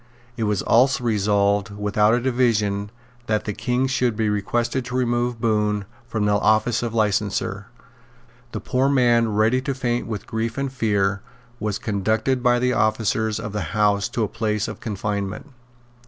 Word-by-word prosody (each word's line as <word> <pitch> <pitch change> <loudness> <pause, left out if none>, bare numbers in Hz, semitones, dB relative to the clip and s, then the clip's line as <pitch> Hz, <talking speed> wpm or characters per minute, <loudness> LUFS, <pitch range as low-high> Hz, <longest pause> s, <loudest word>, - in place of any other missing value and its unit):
It 115 -3 -2
was 105 -2 0
also 125 +1 +3
resolved, 105 -1 +1
without 105 +2 +2
a - - +1
division, 110 -5 +1 0.4
that 105 -1 0
the 105 - -2
King 125 +5 0
should 125 -3 0
be 110 -1 0
requested 120 +5 -1
to 125 0 -5
remove 120 -1 0
Bohun 105 -2 0 0.2
from 110 -3 -1
the 105 - +2
office 110 +3 +2
of 115 -1 -3
licenser. 105 -1 0 0.8
The - - -4
poor 130 +1 +1
man, 120 -4 +3
ready 110 +4 +3
to 140 0 -3
faint 120 -3 -1
with 110 -3 -5
grief 110 +2 -3
and 140 -1 -2
fear, 100 -5 0 0.4
was 105 -1 -2
conducted 110 +5 0
by 120 -1 +3
the 125 +1 +1
officers 110 0 0
of 105 -3 -6
the 95 -3 -4
House 105 +1 +2
to 120 -2 -1
a - - 0
place 105 0 -2
of 110 - -7
confinement. 105 +4 -4
110 Hz, 165 wpm, -22 LUFS, 105-120 Hz, 0.8 s, also